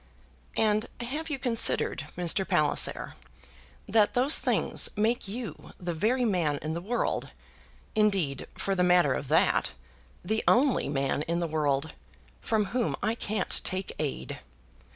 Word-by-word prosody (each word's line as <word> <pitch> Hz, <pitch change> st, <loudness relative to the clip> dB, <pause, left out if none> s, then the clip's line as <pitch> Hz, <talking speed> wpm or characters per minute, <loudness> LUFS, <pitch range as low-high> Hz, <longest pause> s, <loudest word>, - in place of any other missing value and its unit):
"And 215 Hz, 0 st, +2 dB
have 295 Hz, +7 st, -4 dB
you 300 Hz, -, -2 dB
considered, 245 Hz, -3 st, +2 dB
Mr. 180 Hz, +2 st, +2 dB
Palliser, 155 Hz, -4 st, +2 dB, 0.7 s
that 215 Hz, -1 st, +3 dB
those 260 Hz, +5 st, +5 dB
things -, -, +1 dB
make 220 Hz, +1 st, 0 dB
you 220 Hz, -4 st, -7 dB
the 175 Hz, -1 st, -3 dB
very 235 Hz, +10 st, +1 dB
man 170 Hz, -9 st, 0 dB
in 155 Hz, +1 st, -2 dB
the 170 Hz, -, -4 dB
world, 230 Hz, +6 st, -2 dB, 0.6 s
indeed, 195 Hz, -10 st, +1 dB
for 195 Hz, -, -1 dB
the 185 Hz, -, 0 dB
matter 180 Hz, -6 st, +4 dB
of 135 Hz, -, -4 dB
that, 155 Hz, +4 st, +2 dB, 0.5 s
the 220 Hz, +4 st, -1 dB
only 260 Hz, -, +3 dB
man 140 Hz, 0 st, -1 dB
in 170 Hz, +1 st, 0 dB
the 170 Hz, -, -1 dB
world, 150 Hz, -2 st, -1 dB, 0.5 s
from 215 Hz, -2 st, 0 dB
whom 245 Hz, -2 st, 0 dB
I 220 Hz, -, +1 dB
can't 215 Hz, -3 st, -1 dB
take 185 Hz, +1 st, -1 dB
aid. 150 Hz, -3 st, -4 dB
195 Hz, 140 wpm, -28 LUFS, 160-230 Hz, 0.7 s, those